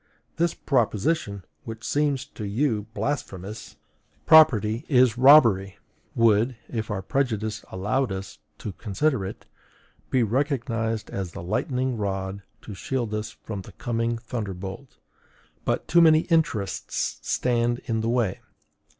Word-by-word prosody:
This 170 0 +1
proposition 110 - 0 0.2
which 115 0 -8
seems 145 -2 0
to 135 -6 -9
you 105 0 0
blasphemous 105 -8 -4 0.5
PROPERTY 120 -7 +6
IS 125 -5 +4
ROBBERY 120 -8 +6 0.4
would, 115 +2 +3
if 110 -1 -4
our 100 -3 -3
prejudices 110 -3 -1
allowed 105 +7 0
us 95 0 -6 0.2
to 105 - -5
consider 115 +5 -1
it, 95 - -7 0.6
be 130 -2 +2
recognized 115 -3 -1
as 95 -3 -4
the - - -7
lightning 125 +6 -1
rod 95 -1 -3 0.2
to 105 - -8
shield 115 +3 -3
us 105 0 -3
from 105 -3 -7
the - - -13
coming 115 0 -2
thunderbolt; 105 -1 -6 0.7
but - - -1
too 170 - +5
many 160 -1 +6
interests 150 -12 0
stand 120 -1 0
in 115 -1 -1
the 115 - -1
way!... 115 -6 0
115 Hz, 125 wpm, -25 LUFS, 100-130 Hz, 0.7 s, PROPERTY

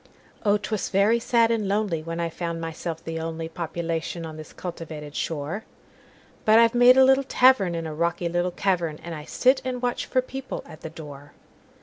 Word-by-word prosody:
Oh! 205 -1 +4
'twas 210 0 -3
very 205 +4 +3
sad 230 -1 +3
and 220 -3 0
lonelyWhen 170 -5 -1
I 170 0 -1
found 170 0 -4
myself 165 0 -5
the 165 0 -4
onlyPopulation 165 +1 -4
on 160 -1 -7
this 155 0 -10
cultivated 155 -4 -7
shore; 160 +7 -3 0.8
But 220 +1 +6
I've 230 0 +5
made 245 +1 +7
a 265 - +8
little 265 +1 +5
tavernIn 200 -11 +3
a 155 - -4
rocky 170 +2 -1
little 175 +1 0
cavern, 175 -4 -1
And 170 - -6
I 150 -2 -7
sit 260 - +3
and 255 -1 -3
watch 245 0 -2
for 255 -1 +1
people 265 +1 -6
at 155 - -13
the 160 - -6
door. 145 -3 -11
170 Hz, 180 wpm, -25 LUFS, 160-225 Hz, 0.8 s, a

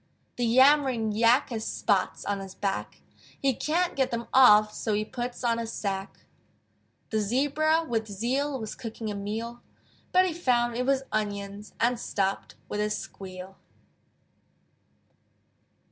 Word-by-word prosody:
The 240 -1 +1
Yammering 260 -2 +4
Yak 235 +5 +3
Has 220 -2 -3
spots 200 -4 0
on 200 -1 -1
his 195 -1 -9
back: 195 -1 -3 0.4
He 275 -1 +2
can't 340 +8 0
get 265 -2 +1
them 235 0 -3
off, 210 -5 +7
So 215 -1 -1
he 215 +1 -1
puts 245 +2 -5
on 235 -1 +1
a 230 - -3
sacque. 195 -3 -4 0.9
The 220 - +1
Zebra 290 +9 +2
with 225 -2 -1
zeal 260 +7 -1
Was 220 -2 -5
cooking 225 -2 -6
a - - -4
meal: 220 +4 -5 0.5
But 370 0 +5
he 360 - -1
found 240 -7 +1
it 250 +2 -1
was 270 -1 +2
onions 205 -1 -4
And 240 0 +2
stopped 195 -4 -2
with 210 - -4
a 210 0 +1
squeal. 190 -2 -7
230 Hz, 145 wpm, -27 LUFS, 205-260 Hz, 0.9 s, off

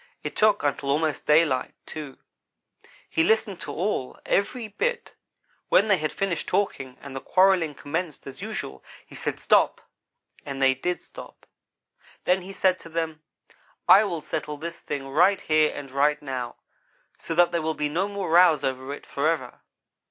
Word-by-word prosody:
It - - -5
took 215 -1 +3
until 140 -1 -1
almost 150 +1 0
daylight, 150 -4 +3
too. 150 -4 -8 0.9
He 160 - +1
listened 220 -1 +1
to 145 - -6
it - - -8
all 175 -8 -2
every 225 +3 0
bit. 475 - -2 0.6
When 215 - +4
they 200 - +5
had 155 0 -1
finished 190 -4 -2
talking 140 -10 -1
and 140 -1 -8
the 135 - -4
quarrelling 185 -5 +3
commenced 160 +3 -4
as 135 - -9
usual, 65 0 -6 0.2
he - - -17
said, - - -4
'stop!' - - +3 0.6
and 140 -1 -6
they 135 -1 +5
did 175 +7 -3
stop. - - -12 0.8
"Then 180 +1 +2
he 185 +2 -9
said 185 -1 +2
to 165 - -12
them: 160 -1 -3 0.7
'I 205 +3 +8
will 170 -6 -3
settle 150 0 -4
this 165 +2 -7
thing 140 -2 -5
right 180 +8 +4
here 155 -1 +3
and 135 -2 -8
right 145 +2 +2
now, 130 -4 -5 0.6
so 165 - -4
that 175 +1 +5
there 170 -1 0
will 160 0 -1
be 150 0 -1
no 175 +7 0
more 200 -4 -4
rows 170 -4 +6
over 130 +1 -2
it, - - -14
forever.' 140 -3 -2
160 Hz, 170 wpm, -25 LUFS, 140-185 Hz, 0.9 s, I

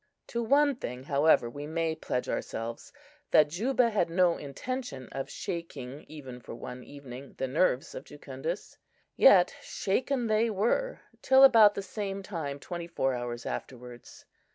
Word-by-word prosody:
To 235 - -2
one 280 +3 +3
thing, 125 - -6
however, 140 -2 +3
we 145 +5 -7
may 165 0 -1
pledge 125 -5 -3
ourselves, 115 +1 -4 0.4
that 150 -1 +5
Juba 235 - +1
had 185 -5 +1
no 175 0 +3
intention 145 - -6
of 135 - -5
shaking, 145 -5 -6
even 135 -5 -9
for 120 - -9
one 125 +1 -8
evening, 135 -1 -11
the 130 - -2
nerves 135 -1 +1
of - - -8
Jucundus; 145 +5 -6 0.4
yet 185 -8 +6
shaken 250 +5 -1
they 220 +1 +2
were 225 - 0 0.2
till 265 0 +6
about 220 -6 +8
the 200 - -3
same 195 0 -5
time 155 -8 -5
twenty 170 +2 -6
four 135 -6 0
hours 120 -1 -5
afterwards. 125 -1 -8
160 Hz, 150 wpm, -29 LUFS, 130-210 Hz, 0.4 s, about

